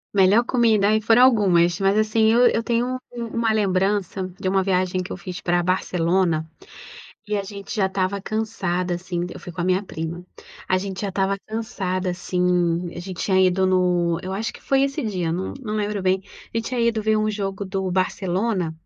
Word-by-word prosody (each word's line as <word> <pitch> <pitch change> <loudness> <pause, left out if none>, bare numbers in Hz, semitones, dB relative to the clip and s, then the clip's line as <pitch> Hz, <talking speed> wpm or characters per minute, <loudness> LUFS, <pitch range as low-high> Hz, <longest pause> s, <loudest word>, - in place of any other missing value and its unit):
Melhor 200 +4 +5
comida, 225 -5 +3
aí, 215 0 +3
foram 230 +3 +5
algumas 185 -8 +4
mas 195 +1 +2
assim 215 +1 +3
eu 235 +2 +4
eu 230 - +1
tenho 245 +2 -1
uma 230 -1 -1
lembrança 195 -2 0
de 190 - -3
uma 190 +1 +2
viagem 185 -1 0
que 180 - -8
eu - - -4
fiz 180 0 -7
pra 175 0 +1
Barcelona, 175 -2 +1 0.8
e 210 - -1
a 200 - -1
gente 200 0 -8
já 205 -4 +2
estava 190 +1 -1
cansada, 190 -5 -2
assim, 175 0 -3
eu - - -9
fui - - -8
com 175 0 -7
a - - 0
minha 185 +2 +2
prima, 170 -1 -6 0.4
a 185 - +3
gente 190 -1 -5
já 200 - -2
estava 195 +1 0
cansada, 190 -4 -2
assim, 180 -1 0
a - - -6
gente 180 0 -7
tinha 190 -1 +2
ido 185 +1 +2
no, 180 -2 +2
eu 185 - -5
acho 215 +4 -3
que - - -14
foi 270 0 +2
esse 275 +2 -1
dia 185 -7 -2
não 185 +3 -3
não 215 -4 -4
lembro 210 -1 -1
bem, 190 0 +1 0.3
a - - -1
gente 225 - -1
tinha 250 -2 -2
ido 230 -2 +1
ver 220 0 +2 0.2
jogo 200 -1 -3
do 190 -1 -3
Barcelona, 185 0 0
190 Hz, 195 wpm, -23 LUFS, 180-215 Hz, 0.8 s, Melhor